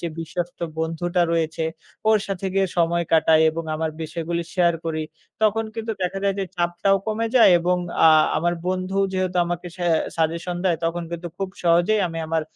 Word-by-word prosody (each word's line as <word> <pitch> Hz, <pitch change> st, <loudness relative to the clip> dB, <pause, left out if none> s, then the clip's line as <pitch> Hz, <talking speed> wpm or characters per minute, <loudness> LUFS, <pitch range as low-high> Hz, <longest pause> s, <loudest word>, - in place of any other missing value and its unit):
যে 170 Hz, -, -3 dB
বিশ্বস্ত 175 Hz, +2 st, -4 dB, 0.2 s
বন্ধুটা 165 Hz, +2 st, -1 dB
রয়েছে 160 Hz, -1 st, -1 dB, 0.5 s
ওর 220 Hz, -1 st, +5 dB
সাথে 195 Hz, -1 st, -3 dB
গিয়ে 195 Hz, 0 st, +3 dB
সময় 170 Hz, 0 st, +2 dB
কাটাই 160 Hz, 0 st, +5 dB
এবং 165 Hz, +1 st, -5 dB
আমার 160 Hz, 0 st, -2 dB
বিষয়গুলি 165 Hz, +2 st, -3 dB
share 175 Hz, -3 st, +3 dB
করি। 160 Hz, -1 st, -2 dB, 0.4 s
তখন 220 Hz, +1 st, +2 dB
কিন্তু 225 Hz, 0 st, -3 dB
দেখা 185 Hz, +2 st, -1 dB
যায় 195 Hz, -, +2 dB
যে -, -, 0 dB
চাপটাও 175 Hz, +3 st, +2 dB
কমে 220 Hz, +1 st, -1 dB
যায়, 230 Hz, -, +7 dB
এবং 180 Hz, +1 st, +1 dB, 0.3 s
আ -, -, +9 dB, 0.3 s
আমার 175 Hz, +2 st, +1 dB
বন্ধু 185 Hz, +1 st, -2 dB, 0.2 s
যেহেতু 185 Hz, -1 st, -1 dB
আমাকে 175 Hz, 0 st, -4 dB
সে 180 Hz, -, -3 dB, 0.3 s
suggestion 170 Hz, +2 st, -1 dB
দেয় 175 Hz, -3 st, +2 dB
তখন 170 Hz, +1 st, -1 dB
কিন্তু 170 Hz, 0 st, -5 dB
খুব 195 Hz, -1 st, -2 dB
সহজেই 175 Hz, +5 st, +3 dB
আমি 165 Hz, 0 st, -5 dB
আমার 160 Hz, 0 st, 0 dB
175 Hz, 175 wpm, -23 LUFS, 165-185 Hz, 0.5 s, আ